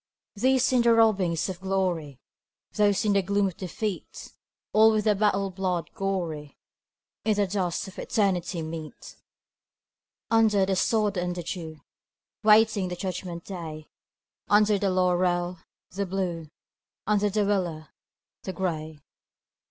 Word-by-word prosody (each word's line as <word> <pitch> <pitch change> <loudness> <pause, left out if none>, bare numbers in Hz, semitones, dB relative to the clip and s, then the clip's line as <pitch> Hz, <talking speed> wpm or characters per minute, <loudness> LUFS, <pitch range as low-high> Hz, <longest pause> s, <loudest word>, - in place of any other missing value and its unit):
These 260 +4 +2
in 250 - +4
the 235 -1 +5
robings 195 -7 +2
of 185 -2 -5
glory, 180 -8 -1 0.5
Those 205 -1 +2
in 210 - +3
the 200 - +3
gloom 200 +2 +1
of 185 -3 -2
defeat, 195 +2 -5 0.4
All 220 +1 +6
with 215 -1 +1
the 215 - +4
battle 200 -1 +1
blood 180 -4 -2
gory, 170 -7 -3 0.7
In 215 +1 +2
the 205 0 +2
dusk 185 -2 -2
of 190 - -10
eternity 185 -5 0
meet: 160 -1 -8 1.1
Under 215 -4 +4
the 190 0 0
sod 210 0 +1
and 175 0 -2
the 175 - -5
dew, 160 -3 -6 0.6
Waiting 215 -2 +5
the 180 - -4
judgment 180 -2 -5
day; 160 -5 -7 0.6
Under 210 0 +4
the 195 - +1
laurel, 180 -1 +1 0.3
the 195 +2 -3
Blue, 175 -4 -3 0.6
Under 210 0 +2
the 205 +1 +1
willow, 175 -6 -1 0.6
the 190 - -5
Gray. 160 -4 -3
190 Hz, 135 wpm, -26 LUFS, 175-205 Hz, 1.1 s, All